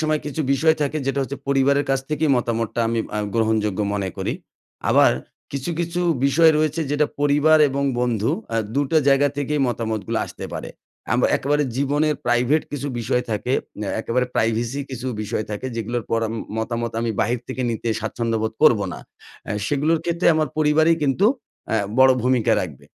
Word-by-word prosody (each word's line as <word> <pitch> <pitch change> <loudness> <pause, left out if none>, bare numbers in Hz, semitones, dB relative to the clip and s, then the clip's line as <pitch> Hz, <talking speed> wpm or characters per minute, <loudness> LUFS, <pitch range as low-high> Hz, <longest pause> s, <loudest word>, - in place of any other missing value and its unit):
সময় 155 -1 +1
কিছু 150 +2 -3
বিষয় 160 +4 +3
থাকে, 145 +1 -1
যেটা 135 0 0
হচ্ছে 135 +1 -5
পরিবারের 140 +1 +3
কাছ 135 -1 +2
থেকে 155 +1 0
মতামতটা 115 -1 -1
আমি 115 0 0 0.2
আ - - 0 0.2
গ্রহণযোগ্য 110 -3 +1
মনে 100 -2 -1
করি, - - -2 0.6
আবার - - +5 0.4
কিছু, 140 +4 -3
কিছু 170 +1 -2 0.3
বিষয় 160 +4 +5
রয়েছে 155 +1 0
যেটা 145 +1 +2
পরিবার 145 +2 +4
এবং 140 +1 -2 0.2
বন্ধু, 115 -3 0 0.2
আ - - +2 0.2
দুটা 145 +3 +2
জায়গা 140 +1 +4
থেকেই 145 +1 -1
মতামতগুলো 110 -4 -2
আসতে - - -9
পারে। - - -5 0.4
আম - - +2 0.2
একেবারে 145 +2 +1
জীবনের 145 +3 +1
প্রাইভেট 125 +6 +2
কিছু 145 -1 -3
বিষয় 120 +2 0
থাকে, 110 +4 -2 0.3
অ্যা 105 - -2
একেবারে 125 +3 0
প্রাইভেসি 115 +4 0
কিছু 130 -1 -5 0.2
বিষয় 110 +1 -2
থাকে 105 +5 -4
যেগুলোর 115 +1 -3
পর 115 - +1 0.2
ম - - -4 0.2
মতামত 115 0 -2
আমি 115 0 -1
বাহির 120 +2 0
থেকে 130 - -3
নিতে 115 +1 -3
স্বাচ্ছন্দ্যবোধ 110 0 -2
করবো 115 -9 +5
না। - - -7 0.5
আ - - -4 0.2
সেগুলোর 150 +3 +1
ক্ষেত্রে 170 +1 0
আমার 155 -1 +1
পরিবারই 155 +2 +4
কিন্তু, 145 +8 +2 0.4
অ্যা 110 - +1 0.2
বড় 130 0 +7
ভূমিকা 125 -2 +2
রাখবে। 75 -7 -8
130 Hz, 170 wpm, -22 LUFS, 115-145 Hz, 0.6 s, বড়